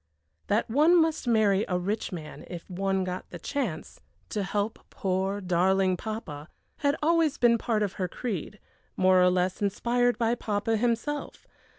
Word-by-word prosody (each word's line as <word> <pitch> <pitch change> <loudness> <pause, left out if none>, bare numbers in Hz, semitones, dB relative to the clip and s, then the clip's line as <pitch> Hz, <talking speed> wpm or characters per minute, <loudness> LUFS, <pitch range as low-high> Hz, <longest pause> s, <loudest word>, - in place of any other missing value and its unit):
That 210 +2 +1
one 310 +9 +5
must 320 -4 +1
marry 215 -3 +3
a 180 - 0
rich 205 +5 -2
man 160 -4 -8
if 175 -2 -8
one 195 +1 -1
got 180 0 -5
the 175 - -7
chance, 195 - -4 0.3
to 210 - -2
help 205 +3 -2
poor, 190 +1 -1
darling 185 +1 +2
papa, 175 -8 -6 0.3
had 285 -1 +1
always 325 -2 +3
been 235 -1 +4
part 215 -2 0
of 200 - -2
her 185 - +1
creed, 210 0 -5 0.4
more 185 0 +5
or 180 - +6
less 180 +1 0
inspired 240 +4 +1
by 230 0 +1
papa 220 -1 -1
himself. 240 +6 -2
205 Hz, 160 wpm, -27 LUFS, 185-235 Hz, 0.4 s, or